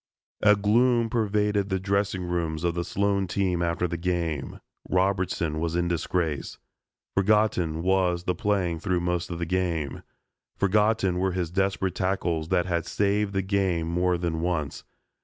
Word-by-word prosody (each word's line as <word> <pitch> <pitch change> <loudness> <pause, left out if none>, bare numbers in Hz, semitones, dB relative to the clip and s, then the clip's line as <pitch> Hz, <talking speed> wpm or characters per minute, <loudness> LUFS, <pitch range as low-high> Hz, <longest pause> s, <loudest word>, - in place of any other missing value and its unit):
A 105 - +6
gloom 115 +3 +3
pervaded 105 -3 +1
the 95 -1 0
dressing 100 0 0
rooms 85 -2 -2
of 85 -1 +1
the 85 0 -2
Sloan 100 +1 0
team 90 -2 0
after 85 +1 0
the 85 0 -3
game. 85 -4 -2 0.3
Robertson 95 -4 0
was 85 0 -1
in 85 0 +1
disgrace. 85 -3 -2 0.6
Forgotten 100 -5 +2
was 90 -2 +2
the 90 - 0
playing 90 -5 0
through 90 +1 0
most 90 0 -1
of 85 - -4
the 85 - -2
game. 85 -5 -1 0.6
Forgotten 100 -2 +2
were 95 0 0
his 90 -3 -2
desperate 95 -1 0
tackles 85 -4 -1
that 90 - +2
had 85 -2 -1
saved 100 0 0
the 95 0 0
game 95 -4 0
more 90 +1 +1
than 85 -2 -2
once. 75 -7 -2
90 Hz, 155 wpm, -26 LUFS, 85-100 Hz, 0.6 s, A